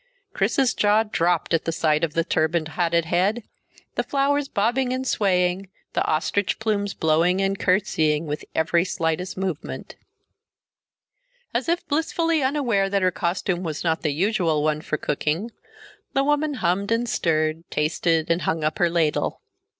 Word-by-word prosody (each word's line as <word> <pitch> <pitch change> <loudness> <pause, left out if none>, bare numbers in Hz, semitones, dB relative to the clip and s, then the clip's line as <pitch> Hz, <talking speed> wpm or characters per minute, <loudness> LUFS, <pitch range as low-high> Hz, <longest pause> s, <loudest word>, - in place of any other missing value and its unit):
Chris's 265 -3 +2
jaw 210 +1 +3
dropped 175 -6 0
at 165 - +1
the 165 - 0
sight 155 -1 +1
of 160 -2 -1
the 165 - +2
turbaned, 160 0 0
hatted 170 +1 +1
head, 190 +7 +1 0.5
the - - 0
flowers 285 0 0
bobbing 245 +4 0
and 260 +1 -2
swaying, 185 -4 +1 0.2
the - - +1
ostrich 175 +5 0
plumes 205 -2 -1
blowing 165 +4 +2
and 195 0 0
curtseying 165 -5 +1
with 150 0 -4
every 170 +2 +2
slightest 180 +1 -2
movement. 185 -5 -4 1.6
As - - -1
if 345 +1 0
blissfully 325 +1 +1
unaware 255 -8 +1
that 200 -1 0
her 185 - +3
costume 180 0 -1
was 160 -4 -4
not 160 -1 0
the 155 - 0
usual 170 -2 +1
one 155 0 0
for 155 - -2
cooking, 155 +11 -2 0.6
the 275 - +2
woman 295 +1 +1
hummed 195 0 0
and 235 +1 +1
stirred, 155 -4 0
tasted, 160 +2 0
and 165 +2 +1
hung 160 -1 -1
up 155 +1 -1
her 175 - +3
ladle. 165 -3 0
180 Hz, 155 wpm, -23 LUFS, 160-215 Hz, 1.6 s, jaw